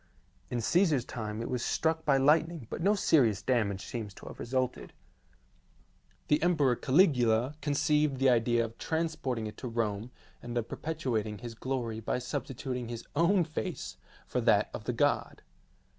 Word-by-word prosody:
In 120 -1 -2
Caesar's 155 - +2
time 110 -1 -5
it - - -4
was 125 -2 -2
struck 160 0 0
by 140 -3 +4
lightning 155 +1 +3
but - - -4
no 200 +4 +3
serious 120 - +3
damage 105 -6 0
seems 105 -4 -6
to - - -13
have - - -9
resulted. 130 +1 -2 1.3
The 150 - +3
Emperor 155 -7 +3
Caligula 130 - +3
conceived 150 0 +1
the 135 +1 +3
idea 120 -1 +3
of 115 0 -10
transporting 160 -8 -2
it 105 0 -7
to 125 - -5
Rome, 115 -1 -2 0.3
and 120 0 -5
of 120 -1 -1
perpetuat 135 -9 -2
ing 105 -1 -6
his 120 0 -7
glory 120 -2 -3
by 115 - -1
substituting 125 0 -4
his 115 -1 -6
own 175 +4 +4
face 155 -1 -5 0.3
for - - -1
that - - +3
of - - -7
the - - -1
god. - - 0
125 Hz, 160 wpm, -30 LUFS, 115-150 Hz, 1.3 s, by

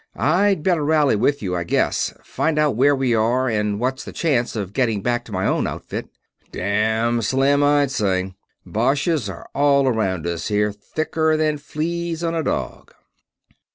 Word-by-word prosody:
I'd 185 +2 +2
better 175 -4 +2
rally 150 -4 +3
with 140 +5 +1
you, 90 -2 -2
I 85 - -1
guess 85 - 0
find 160 -1 -1
out 150 -5 +2
where 140 +4 +4
we 130 -3 +1
are, 120 +4 +2
and 105 -3 -1
what's 130 +2 -2
the - - -8
chance 130 -9 0
of 100 -3 -4
getting 110 -5 0
back 120 0 0
to 115 - -12
my 95 -1 -1
own - - +1
outfit." - - -6 0.4
"Damn 110 +4 0
slim, 135 +5 +2
I'd 145 -1 +3
say. 95 -4 -1 0.3
Boches 135 - 0
are 90 - -9
all 140 -1 +3
around 95 -8 0
us 85 -1 -3
here, 105 0 +1
thicker 155 +9 -1
than 155 -1 0
fleas 165 +3 -3
on 165 0 0
a 165 - 0
dog." 150 - -4
130 Hz, 170 wpm, -21 LUFS, 105-150 Hz, 0.4 s, where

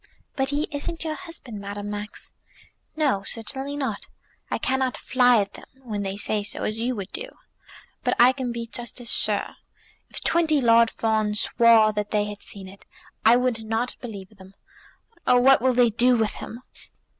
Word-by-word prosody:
"But 270 -1 0
he 290 +2 -1
isn't 320 +3 -3
your 315 -1 -2
husband, 320 - -8
Madame 205 +1 -6
Max." 210 0 -6 0.6
"No; 285 -11 +1
certainly 265 +7 -5
not. 275 -2 -3 0.4
I - - -1
cannot 260 -1 -1
fly 250 -1 +4
at 200 -1 -2
them, - - -12 0.2
when 215 -4 -4
they 195 0 -3
say 210 +1 0
so, 205 - -4
as 215 +1 -2
you 245 +2 -1
would 200 -2 -6
do. - - -5 0.8
But - - +1
I 245 +2 +8
can 260 -2 -4
be 235 0 -4
just 240 +1 -5
as 240 -1 -4
sure. - - +1 0.5
If - - -7
twenty 320 -3 +2
Lord 230 -2 +5
Fawns 215 -2 0
swore 225 -2 +5
that 210 0 -2
they 210 -1 +1
had 205 0 -7
seen 195 -2 -7
it, 195 +1 -14 0.4
I 225 +2 +7
would 245 -3 0
not 225 +3 -2
believe 215 -4 -9
them. 190 0 -15 0.7
Oh, 250 -1 +6
God, 245 - +3
what 270 -2 +6
will 260 0 +3
they 240 -2 +4
do 245 +3 +4
with 220 -2 0
him!" 235 +3 -9
235 Hz, 185 wpm, -24 LUFS, 210-260 Hz, 0.8 s, I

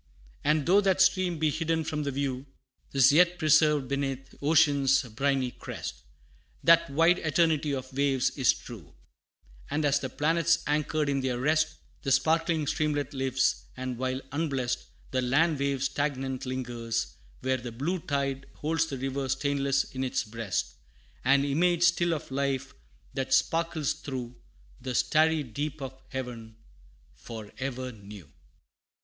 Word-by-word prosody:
And 150 -1 +2
though 195 +4 +5
that 190 -2 +2
stream 185 -2 +3
be 155 -1 +1
hidden 160 +1 0
from 150 -1 -3
the 145 - -2
view, 135 0 -3 0.4
'Tis 135 -1 +6
yet 175 +3 +4
preserved 150 -4 +3
'neath 135 -1 -3
ocean's 145 -3 +4
briny 130 +2 0
crest: - - -7 0.6
That 170 0 +5
wide 165 +5 +4
eternity 155 -2 +2
of 130 -1 -5
waves 135 -2 +1
is 130 -3 +3
true 105 - -10 0.7
And 155 0 0
as 140 0 +3
the 130 - -4
planets 165 +4 +2
anchored 150 0 0
in 140 -1 0
their 130 -2 -1
rest, 155 +4 +1 0.3
The 135 - -2
sparkling 160 +3 +2
streamlet 145 0 -1
lives; 130 -1 0
and 130 -2 -4
while 130 0 -1
unblest, 140 -5 -1 0.3
The 130 - +1
land 145 +5 +2
wave 140 -1 0
stagnant 135 -1 -2
lingers 120 -3 -3 0.3
there 130 0 +1
the 120 -1 -7
blue 150 +11 -2
Tide 140 -3 -2
holds 160 +1 0
the 135 - -5
river 135 +1 -3
stainless 140 0 +1
in 130 0 -3
its 130 - -1
breast 110 -4 -3 0.5
An 140 +2 +4
image 170 +4 +2
still 175 0 +3
of 145 - -8
life, 135 -1 -1 0.4
that 130 -1 +1
sparkles 165 0 +1
through 125 -3 -6 0.5
The 130 -1 -4
starry 155 +2 +3
deep 145 +5 -4
of 135 -1 -6 0.2
heaven, 120 -4 -6 0.6
for 110 - -9
ever 130 -1 -3
new. 100 -6 -12
140 Hz, 145 wpm, -28 LUFS, 130-155 Hz, 0.7 s, Tis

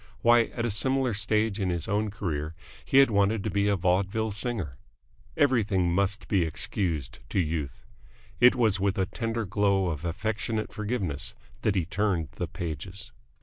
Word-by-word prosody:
Why, 120 0 +6
at 120 +1 -4
a 120 - 0
similar 130 +3 +1
stage 105 0 0
in 95 -2 0
his 85 -2 -2
own 105 +2 0
career 80 -6 -3 0.3
he 135 - +1
had 135 -3 +7
wanted 100 0 +2
to - - -2
be 100 0 +1
a 100 - +3
vaudeville 95 +4 +1
singer. 100 - -3 0.6
Everything 105 -10 +2
must 100 +2 0
be 100 -3 +2
excused 75 -6 -2
to - - 0
Youth. 75 -5 -2 0.5
It 125 +1 +7
was 110 -6 +2
with 100 0 +1
a 95 - +2
tender 115 +3 -3
glow 100 -1 +2
of 75 -2 -4
affectionate 110 +5 -2
forgiveness 100 - -3 0.3
that 105 - +1
he 90 -4 +1
turned 90 -4 0
the - - -2
pages. 90 - -6
100 Hz, 165 wpm, -28 LUFS, 90-110 Hz, 0.6 s, had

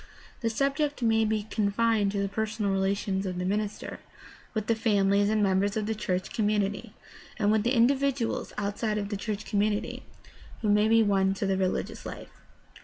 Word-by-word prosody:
The 230 - 0
subject 275 +3 0
may 225 -1 +3
be 215 -1 0
confined 215 0 +1
to 200 - -1
the - - 0
personal 215 0 -2
relations 195 0 0
of 180 -1 -4
the 180 - -2
minister 205 +2 -3 0.6
with 215 -1 -1
the 230 - +2
families 205 -2 +2
and 215 -1 +2
members 200 +2 +1
of 215 - -1
the 220 - -1
church 185 -4 -3
com 215 -2 +1
munity, 210 +1 -1 0.4
and 205 -1 +2
with 220 0 +3
the 245 +5 +1
individuals 265 0 +1
outside 210 +1 -1
of 200 -1 -3
the 205 - -2
church 210 +1 -4
com 205 - -1
munity 210 0 -1 0.6
who 210 - +1
may 210 +1 +4
be 225 0 +5
won 195 -2 +2
to 200 - -2
the 195 0 +1
religious 190 -1 -2
life. - - -8
210 Hz, 185 wpm, -28 LUFS, 200-225 Hz, 0.6 s, be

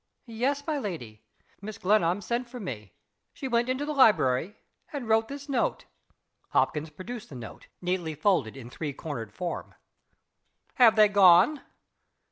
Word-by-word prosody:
"Yes, 260 +5 -2
my 305 -3 -1
lady. 125 - -6 0.4
Mrs. 215 +2 -8
Glenarm 190 -1 +2
sent 240 +3 -3
for 250 0 -8
me. 110 - -7 0.4
She 270 - -6
went 240 0 +1
into 260 +3 -1
the 300 - -3
library, 205 - +3 0.3
and 280 -6 -5
wrote 225 0 +3
this 280 +1 -8
note." 265 -4 -1 0.6
Hopkins 155 +1 0
produced 215 +9 -8
the 140 - -10
note, 120 -3 -10 0.2
neatly 175 -3 -2
folded 145 - +1
in 120 -2 -10
three 150 0 -5
cornered 125 -8 -6
form. 175 +10 -5 1.0
"Have 230 -3 +6
they 215 -1 +7
gone?" 200 - +5
205 Hz, 145 wpm, -27 LUFS, 155-245 Hz, 1.0 s, they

